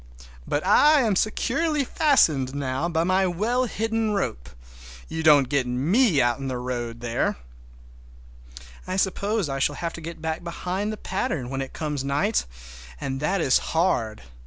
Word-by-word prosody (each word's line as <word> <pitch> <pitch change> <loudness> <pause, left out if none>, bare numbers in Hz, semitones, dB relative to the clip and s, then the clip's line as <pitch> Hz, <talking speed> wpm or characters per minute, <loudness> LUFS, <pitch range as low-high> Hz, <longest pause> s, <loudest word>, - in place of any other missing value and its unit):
But 145 +4 -1
I 295 +9 +6
am 220 -5 +1
securely 285 - 0
fastened 155 - +2
now 140 +3 -2
by 165 -1 +1
my 185 +2 +2
well 225 +9 0
hidden 225 -1 -1
rope—you - - -6
don't 145 -4 +6
get 135 -2 0
me 160 - +2
out 120 0 +2
in 135 - -4
the 130 -1 -3
road 120 -2 -4
there! 120 - -1 1.5
I 185 - -2
suppose 200 +1 0
I 135 -1 -3
shall 145 +2 +1
have 170 +2 -4
to 170 - -8
get 165 +1 -7
back 160 +1 -3
behind 180 +4 -3
the 215 - -5
pattern 160 -11 -3
when 135 0 -2
it 135 - -6
comes 150 -4 -3
night, 145 - 0 0.5
and 135 0 -3
that 180 +6 0
is 130 - +4
hard! 120 - -1
160 Hz, 160 wpm, -24 LUFS, 130-200 Hz, 1.5 s, I